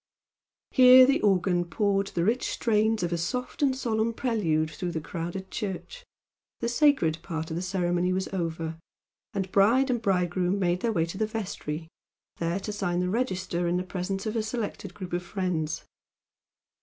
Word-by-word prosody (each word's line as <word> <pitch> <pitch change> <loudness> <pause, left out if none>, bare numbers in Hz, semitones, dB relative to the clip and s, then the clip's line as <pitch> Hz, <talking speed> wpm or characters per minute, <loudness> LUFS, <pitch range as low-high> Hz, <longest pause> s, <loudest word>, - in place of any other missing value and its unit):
Here 255 0 +9
the 275 +2 +2
organ 185 -3 +2
poured 195 +2 0
the 170 - -1
rich 235 +5 +1
strains 220 -2 +1
of 175 0 -1
a 170 - -1
soft 250 - -3
and 270 -2 +3
solemn 230 -3 0
prelude 165 - 0
through 175 +3 -4
the 160 - -1
crowded 175 +3 -5
church 210 - -5 0.6
the 235 - -1
"sacred" 235 - +3
part 160 -2 -5
of - - -2
the 170 - -2
ceremony 180 -1 0
was 190 +1 -1
over, 165 -3 -3 0.6
and 190 -1 -2
bride 240 +7 +4
and 240 -2 0
bridegroom 180 -2 +1
made 180 -2 +1
their 230 +3 0
way 165 -6 +1
to 170 +4 -7
the 220 - +1
vestry, 180 -7 -4 0.5
there 170 +3 -1
to 210 - -4
sign 180 -4 -1
the 180 0 0
register 185 -7 -1
in 175 +1 +1
the 180 - -1
presence 190 +2 -4
of 215 +1 -2
a 225 - +1
selected 220 0 -4
group 185 -3 -7
of 175 - 0
friends. 175 -4 -2
190 Hz, 175 wpm, -27 LUFS, 175-220 Hz, 0.6 s, Here